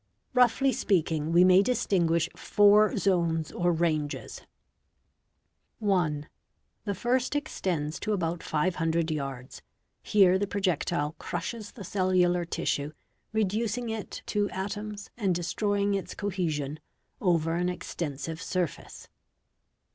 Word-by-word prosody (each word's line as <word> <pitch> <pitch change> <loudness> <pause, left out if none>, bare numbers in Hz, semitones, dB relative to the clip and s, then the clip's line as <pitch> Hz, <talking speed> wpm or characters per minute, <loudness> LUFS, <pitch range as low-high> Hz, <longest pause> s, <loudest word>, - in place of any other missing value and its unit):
| - - -50
Roughly 255 +2 +4
speaking 160 -5 0
we 175 +2 +6
may 185 +1 +7
distinguish 175 -8 +1
four 205 +1 +4
zones 170 -5 +1
or 175 0 +1
ranges 160 -3 -1 0.8
:— 215 - -13
I. 165 -7 +1 0.6
The 200 -2 -1
first 255 +5 0
extends 175 - -2
to 215 - -2
about 170 -4 -1
500 165 0 0
yards. 135 -4 -5 0.4
Here 190 -3 +4
the 205 - 0
projectile 175 -5 -1
crushes 205 +5 -5
the 205 - -9
cellular 180 -2 +2
tissue, 150 -3 -2 0.4
reducing 220 +2 -1
it 220 -2 -5
to 205 -1 0
atoms 205 +2 -5
and 195 -6 +1
destroying 200 +4 0
its 195 -1 -3
cohe 190 -4 -1
sion, 150 0 -3 0.4
over 165 -5 +2
an 175 +1 0
extensive 165 -2 -5
surface. 180 -5 -4
180 Hz, 115 wpm, -28 LUFS, 165-205 Hz, 0.8 s, may